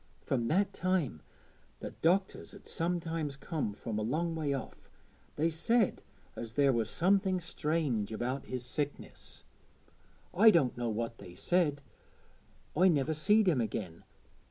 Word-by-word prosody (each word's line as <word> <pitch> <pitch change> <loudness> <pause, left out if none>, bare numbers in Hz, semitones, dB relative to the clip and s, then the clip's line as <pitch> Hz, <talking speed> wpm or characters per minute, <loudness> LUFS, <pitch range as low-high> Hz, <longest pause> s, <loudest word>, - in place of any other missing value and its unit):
From 120 -3 0
that 195 +8 +2
time 180 - 0 0.6
the - - -6
doctors 190 +4 0
'ud - - -14
sometimes 165 -3 -2
come 145 - -3
from 110 +1 -4
a - - -1
long 160 +10 -1
way 155 -3 -1
off; 135 -2 -6 0.5
they 155 +2 +2
said 225 +7 +2 0.3
as 115 -1 -6
there 140 -2 +4
was 115 -2 0
somethin' 190 +1 +2
strange 150 - -1
about 125 +5 -3
his 125 -1 -4
sickness. 145 +2 -5 0.9
I 220 +5 +7
doänt 160 - +3
know 120 -1 -2
what 115 +1 -3
they 90 - -11
said, 150 - +1 0.9
I 180 +5 +5
niver 160 -3 +2
seed 205 +7 +3
him 150 -9 +3
again. 95 -7 -4
150 Hz, 140 wpm, -32 LUFS, 120-175 Hz, 0.9 s, I